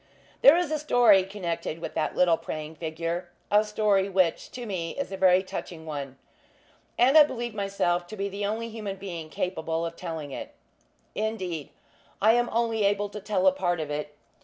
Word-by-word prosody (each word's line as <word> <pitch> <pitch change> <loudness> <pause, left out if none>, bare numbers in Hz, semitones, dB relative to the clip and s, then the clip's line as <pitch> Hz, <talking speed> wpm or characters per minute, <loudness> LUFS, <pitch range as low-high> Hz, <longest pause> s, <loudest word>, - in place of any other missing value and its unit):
There 285 +5 +8
is 350 -3 0
a 310 - 0
story 240 -9 +5
connected 175 -5 -4
with 165 - -6
that 160 - -1
little 175 -2 +4
praying 155 0 -6
figure; 165 +2 -3 0.2
a 210 +1 +5
story, 210 -2 +1
which, 185 -3 +1
to 245 -1 -7
me, 180 -6 -4
is 280 -7 -3
a - - -3
very 185 -1 +4
touching 170 -3 -7
one; 140 -4 -6 0.8
and 260 +4 +4
I 310 - +11
believe 240 -5 0
myself 195 -4 -1
to 215 - -8
be 200 0 -1
the 200 +1 -5
only 220 +3 -2
human 215 -3 -5
being 175 -5 -7
capable 165 -2 -2
of 165 0 -5
telling 160 -5 -6
it. - - -7 0.6
Indeed, 190 -8 -3 0.5
I 220 +3 +5
am 240 0 +2
only 225 -2 +1
able 205 +1 +1
to 210 - -7
tell 215 +7 -1
a 285 - +7
part 175 - -1
of 150 -2 -4
it. 150 0 -4
195 Hz, 185 wpm, -27 LUFS, 165-220 Hz, 0.8 s, I